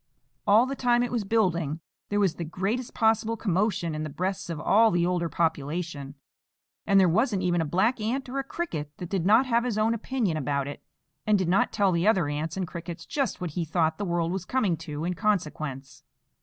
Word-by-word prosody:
All 215 +4 +6
the 275 +1 -3
time 245 -2 +2
it 245 - -3
was 240 -3 -1
building, 175 -8 0 0.3
there 205 - +1
was 195 -5 +2
the 170 - -3
greatest 195 +9 -3
possible 225 0 +2
commotion 195 -4 0
in 155 - -3
the 155 - -3
breasts 185 +5 -3
of 165 -3 -4
all 220 +7 +4
the 175 -4 +1
older 175 -1 0
population; 155 -3 -2 0.7
and 195 0 +5
there 190 - +5
wasn't 200 +2 +1
even 175 -2 +2
a - - 0
black 215 - +1
ant, 255 +5 -2
or 265 +2 -3
a - - -1
cricket, 210 - -4
that 175 - -7
did 190 -3 0
not 225 +6 +6
have 235 -2 +2
his 240 -4 -2
own 220 +2 +2
opinion 230 -6 -1
about 140 -1 -1
it, 145 - -7 0.5
and 210 -1 +5
did 185 -3 -1
not 185 - +3
tell 200 -2 +2
the 170 +2 +1
other 190 -8 +3
ants 150 +4 -3
and 185 -2 -2
crickets 170 +1 -7
just 275 -5 -2
what 180 -3 -4
he 170 +3 -2
thought 160 +1 0
the - - -1
world 170 -2 0
was 190 -1 -3
coming 205 -4 +1
to 155 -1 -5
in 180 - -1
consequence. 155 -8 -2
185 Hz, 215 wpm, -27 LUFS, 165-220 Hz, 0.7 s, All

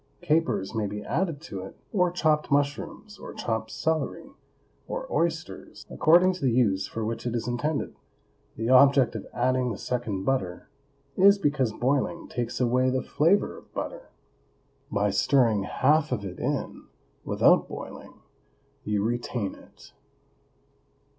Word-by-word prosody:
Capers 120 -12 +1
may 110 -2 -1
be 105 +1 -6
added 165 -2 -1
to 100 - -7
it, 95 - -10 0.2
or 180 -3 +3
chopped 155 -3 +1
mushrooms, 145 +8 -2
or - - -9
chopped 110 -1 -2
celery, 160 -1 -2 0.6
or - - -4
oysters, - - -3
according 175 +4 +5
to 185 - -9
the 135 - +2
use 105 -6 +2
for 110 -1 -4
which 115 +2 -3
it 120 - -2
is 115 - -2
intended. 140 +5 -2 0.6
The 115 - -3
object 135 -1 +6
of 105 - -6
adding 125 0 +1
the 105 - -5
second 110 -6 -3
butter 95 -9 -2 0.5
is 200 +2 +6
because 145 - +1
boiling 135 +8 -1
takes 120 -1 -4
away 125 +1 +2
the 130 0 -1
flavor 170 +7 +2
of - - -15
butter; - - -5 0.8
by - - +1
stirring 115 -8 +2
half 150 +8 +2
of 105 -5 -2
it 90 -2 -7
in, - - -3 0.4
without - - +4
boiling, - - -9 0.7
you 105 -1 0
retain 120 -2 -2
it. - - -17
130 Hz, 140 wpm, -26 LUFS, 110-155 Hz, 0.8 s, object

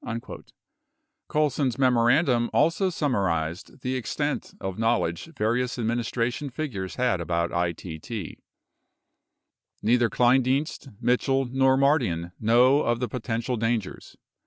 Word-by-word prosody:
59 115 0 -6 0.8
Colson's 145 -4 0
memorandum 125 0 +3
also 185 +4 +2
summarized 95 - -2
the 130 +1 -2
extent 145 +4 -3
of 95 +1 -5
knowledge 115 -7 0
various 120 +4 0
administration 120 +3 -1
figures 120 -9 -5
had 125 -8 +1
about 85 0 -1
ITT: 85 +3 -4 1.4
Neither 120 +1 +3
Kleindienst, 130 +4 +1
Mitchell, 135 +2 +1
nor 130 +1 +2
Mardian 120 - +1
know 125 +5 +4
of 120 0 0
the 125 - -1
potential 120 0 -3
dangers. 115 -2 -3
120 Hz, 105 wpm, -26 LUFS, 110-130 Hz, 1.4 s, know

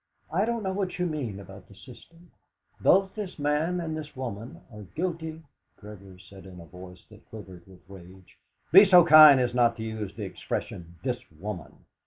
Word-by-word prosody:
"I 195 +5 +1
don't 235 -1 -3
know 190 -1 -3
what 190 -2 -4
you 180 - -1
mean 135 - -5
about 95 -1 -13
the 100 - -18
system; 165 - -17 0.5
both 190 +1 +3
this 205 -4 -7
man 150 +4 -1
and 160 -2 -4
this 150 -2 -9
woman 120 -3 -8
are 105 - -10
guilty 160 - -6 0.2
" - - -49
Gregory 100 -3 -13
said 95 0 -15
in 90 -1 -13
a 85 - -12
voice 90 +1 -14
that 105 +1 -19
quivered 95 -5 -12
with 90 -2 -19
rage: 95 -1 -16 0.3
"Be 190 +5 +9
so 180 -4 +6
kind 155 -4 +8
as 125 -1 -1
not 120 -1 +2
to 110 - -6
use 110 -3 -6
the 110 - -7
expression, 85 -3 -7
'this 125 -2 -2 0.2
woman.'. 95 -1 -9
120 Hz, 190 wpm, -26 LUFS, -, 0.5 s, Be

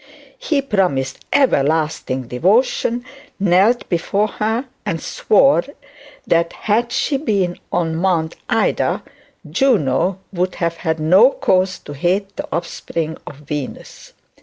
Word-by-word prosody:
He 305 - 0
promised 180 - 0
everlasting 155 - +1
devotion, 230 - +1 0.3
knelt 195 +5 +3
before 195 +4 0
her, 220 +6 -1 0.2
and 165 - -2
swore 275 - +3 0.6
that 170 0 +1
had 230 +3 0
she 275 +3 0
been 200 - -1
on 165 -2 0
Mount 170 -3 0
Ida, - - +1 0.4
Juno 190 - +2 0.2
would 180 0 -1
have 165 -1 -2
no 185 +11 +6
cause 185 -7 +1
to 145 - -10
hate 190 +7 -1
the - - -5
offspring 165 -1 -3
of - - -8
Venus. 145 -2 -7
180 Hz, 110 wpm, -19 LUFS, 160-215 Hz, 0.6 s, no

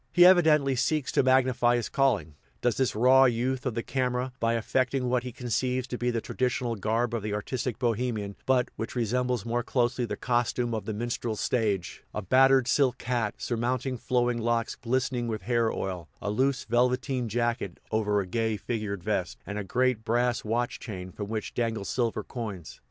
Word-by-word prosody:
He 175 -1 +7
evidently 155 -7 +5
seeks 150 +2 0
to - - +3
magnify 130 -2 +3
his 120 - -1
calling, 105 - +1 0.3
does 120 -2 +2
this 130 -5 0
raw 130 +4 +6
youth 125 +2 0
of 120 - -2
the 115 - -2
camera, 125 -1 -1
by 115 0 +1
affecting 130 +3 0
what 125 0 +2
he 125 0 -6
conceives 125 +1 -1
to 125 - -3
be 125 - 0
the 115 -1 0
traditional 125 -1 -1
garb 115 +4 0
of 115 - -1
the 105 0 -2
artistic 120 +3 -3
Bohemian, 115 -4 -1
but 130 -1 +3
which 115 - -5
resembles 125 -1 0
more 120 +1 0
closely 120 0 0
the - - -4
costume 120 -1 0
of 110 - -3
the 110 - -3
minstrel 120 0 -2
stage 105 -5 -1
a 105 - -1
battered 130 +4 +5
silk 130 -2 +2
hat, 120 -4 -1
surmounting 125 +2 -1
flowing 120 -1 0
locks 115 0 0
glistening 125 -1 -1
with 110 -4 -3
hair 115 +1 +1
oil; 90 -4 -4
a 105 - -2
loose 130 +4 +1
velveteen 125 +1 +1
jacket, 120 -4 -1
over 105 -2 +1
a 100 - -1
gay 110 +2 -1
figured 105 -5 -4
vest; 100 -4 -1
and 105 0 -4
a - - -3
great 125 +3 +1
brass 120 +1 +1
watch 120 +3 -1
chain, 95 -5 -7
from 105 +2 -6
which 110 -1 -4
dangle 115 -4 -1
silver 115 +3 -1
coins. 105 - -7
120 Hz, 185 wpm, -28 LUFS, 110-125 Hz, 0.3 s, He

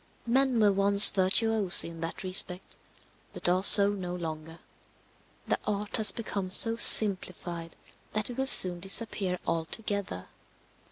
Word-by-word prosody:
Men 255 0 -4
were 210 -2 -1
once 200 +1 +4
virtuosi 200 +1 0
in 165 -1 -15
that 165 +3 -11
respect, 185 0 -4 0.6
but - - -6
are 180 +2 -4
so 200 0 +5
no 180 -3 -10
longer; 160 -1 -12 0.9
the - - -6
art 210 0 -7
has 215 -2 +3
become 200 -4 -10
so 225 +4 +1
simplified 180 -6 +3 0.4
that 215 -1 -6
it 245 - -11
will 265 - -5
soon 180 -8 +6
disappear 195 -1 -7
altogether. 165 - -9
195 Hz, 130 wpm, -23 LUFS, 180-215 Hz, 0.9 s, soon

